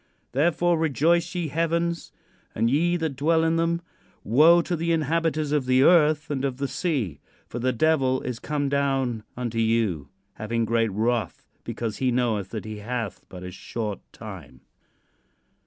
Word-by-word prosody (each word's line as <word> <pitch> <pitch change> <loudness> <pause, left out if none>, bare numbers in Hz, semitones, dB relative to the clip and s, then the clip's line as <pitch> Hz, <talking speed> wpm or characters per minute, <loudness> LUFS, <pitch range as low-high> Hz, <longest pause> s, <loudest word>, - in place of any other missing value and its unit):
"Therefore, 170 +5 +2
rejoice, 165 +4 +2
ye 170 -3 -1
heavens, 170 +2 -1 0.4
and 115 +2 +1
ye 175 +5 +2
that 160 -4 -2
dwell 160 +4 +2
in 165 0 +2
them. 165 +1 +1 0.4
Woe 160 +9 +6
to 175 - -2
the 165 +1 -2
inhabiters 160 -1 0
of 145 -4 0
the 130 +1 +4
earth 155 -2 +4
and 135 -2 -2
of 135 -2 -1
the 140 0 -2
sea; 130 - -2 0.3
for 120 - -6
the 130 +2 +1
devil 130 0 +2
is 125 -2 -4
come 145 -1 -2
down 135 -4 0 0.2
unto 120 -2 -2
you, 110 -11 +1 0.2
having 115 +3 -2
great 115 -1 +1
wrath, 115 +3 -1 0.2
because 115 -3 -4
he 130 - +1
knoweth 115 -6 0
that 110 -2 -6
he 110 -1 -6
hath 115 0 -4
but 90 -1 -9
a 90 - -6
short 105 +1 -5
time." - - -10
135 Hz, 160 wpm, -25 LUFS, 115-160 Hz, 0.4 s, Woe